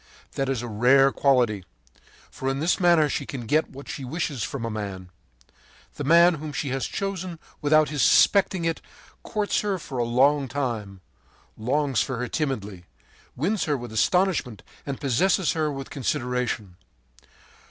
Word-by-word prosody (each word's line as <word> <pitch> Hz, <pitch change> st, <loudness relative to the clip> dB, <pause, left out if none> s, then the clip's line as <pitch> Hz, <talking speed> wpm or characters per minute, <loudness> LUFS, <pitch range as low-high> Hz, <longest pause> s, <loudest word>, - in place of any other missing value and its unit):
That 135 Hz, -1 st, -2 dB
is 130 Hz, -3 st, -1 dB
a -, -, -4 dB
rare 130 Hz, +5 st, +4 dB
quality, 125 Hz, -9 st, +2 dB, 0.7 s
for 135 Hz, -, -3 dB
in 135 Hz, 0 st, -2 dB
this 165 Hz, +6 st, +1 dB
manner 170 Hz, -4 st, +4 dB
she -, -, -3 dB
can 135 Hz, -, -5 dB
get 155 Hz, +7 st, +1 dB
what 140 Hz, +1 st, -11 dB
she 135 Hz, -, -6 dB
wishes 140 Hz, -1 st, -3 dB
from 125 Hz, -1 st, -3 dB
a -, -, -2 dB
man. 100 Hz, -4 st, -6 dB, 0.8 s
The -, -, -6 dB
man 170 Hz, +4 st, +6 dB
whom 155 Hz, -1 st, -6 dB
she 140 Hz, -, -3 dB
has 135 Hz, 0 st, -2 dB
chosen 185 Hz, -3 st, -4 dB, 0.2 s
without 155 Hz, +1 st, +4 dB
his 145 Hz, -2 st, -2 dB
suspecting 190 Hz, -, +4 dB
it 165 Hz, -1 st, -1 dB, 0.4 s
courts 210 Hz, -2 st, -1 dB
her 205 Hz, -2 st, -1 dB
for 135 Hz, -6 st, -6 dB
a -, -, +2 dB
long 135 Hz, +4 st, +3 dB
time, 115 Hz, -8 st, -4 dB, 0.5 s
longs 135 Hz, +3 st, 0 dB
for 130 Hz, -, -2 dB
her 125 Hz, +1 st, -3 dB
timidly, 105 Hz, -, -3 dB, 0.5 s
wins 190 Hz, -, 0 dB
her 150 Hz, -3 st, 0 dB
with 120 Hz, -2 st, -8 dB
astonishment 150 Hz, -, +1 dB, 0.2 s
and 140 Hz, -2 st, -4 dB
possesses 160 Hz, +5 st, +2 dB
her 155 Hz, -2 st, -1 dB
with 135 Hz, -1 st, -7 dB
consideration. 125 Hz, -8 st, -2 dB
135 Hz, 160 wpm, -25 LUFS, 120-155 Hz, 0.8 s, man